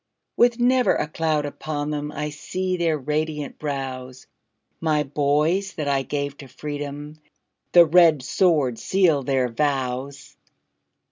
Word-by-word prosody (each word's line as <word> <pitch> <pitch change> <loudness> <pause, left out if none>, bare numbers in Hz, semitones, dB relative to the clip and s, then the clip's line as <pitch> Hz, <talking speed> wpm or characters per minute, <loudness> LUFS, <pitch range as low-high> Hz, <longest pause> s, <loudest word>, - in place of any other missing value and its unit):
With 240 0 +3
never 250 +1 +3
a - - -1
cloud 155 -1 -1
upon 145 0 -4
them, 150 0 -3
I 150 0 -4
see 185 +5 -3
their 165 -3 0
radiant 150 +1 -3
brows; 130 -3 -5 0.5
My 155 -2 +1
boys 150 +7 0
that 150 -4 -3
I 140 -1 +1
gave 140 0 -3
to 140 - -11
freedom, 145 +2 -7 0.5
The 175 -1 +8
red 160 -4 +5
sword 150 -7 +1
sealed 165 -8 +2
their 130 -2 +2
vows! 135 +1 -3
150 Hz, 130 wpm, -23 LUFS, 140-160 Hz, 0.5 s, The